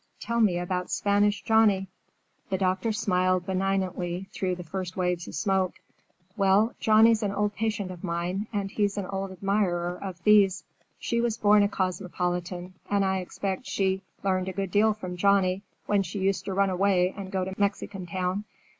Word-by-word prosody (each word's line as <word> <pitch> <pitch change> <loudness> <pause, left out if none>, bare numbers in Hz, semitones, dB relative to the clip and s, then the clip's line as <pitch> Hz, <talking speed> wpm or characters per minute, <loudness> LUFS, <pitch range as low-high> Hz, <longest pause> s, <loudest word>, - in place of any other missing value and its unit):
"Tell 235 0 -2
me 190 -6 +3
about 180 +1 -2
Spanish 205 0 +1
Johnny." 215 -4 +3 0.6
The 190 - 0
doctor 190 +4 0
smiled 185 -3 +1
benignantly 190 -1 -1
through 185 -1 -1
the 180 - -8
first 185 +2 -5
waves 180 -1 -1
of - - -7
smoke. 190 -3 +1 0.6
"Well, 200 +3 +3
Johnny's 220 +1 +5
an 205 -2 0
old 205 +1 0
patient 210 -3 -2
of 180 0 -10
mine, 180 +3 -2
and 200 -3 -2
he's 205 -1 0
an 200 - -2
old 195 +1 -4
admirer 180 -2 -1
of 190 -3 -5
Thea's. 195 0 +4 0.3
She 235 0 -1
was 235 -1 0
born 210 -1 +5
a 205 - +3
cosmopolitan, 180 -1 -3 0.2
and 200 -1 +2
I 190 0 +1
expect 190 +4 -4
she 190 -1 0 0.2
learned 185 -1 0
a - - -5
good 195 0 -3
deal 215 +2 +3
from 185 -4 -6
Johnny 195 0 +3 0.2
when 205 -1 +2
she 195 +2 -5
used 195 0 0
to 195 - -3
run 195 0 +2
away 185 -1 +2
and 195 -2 -7
go 190 -2 -1
to 190 - -5
Mexican 200 -2 -2
Town. 185 +3 -2
195 Hz, 175 wpm, -27 LUFS, 185-205 Hz, 0.6 s, Johnny's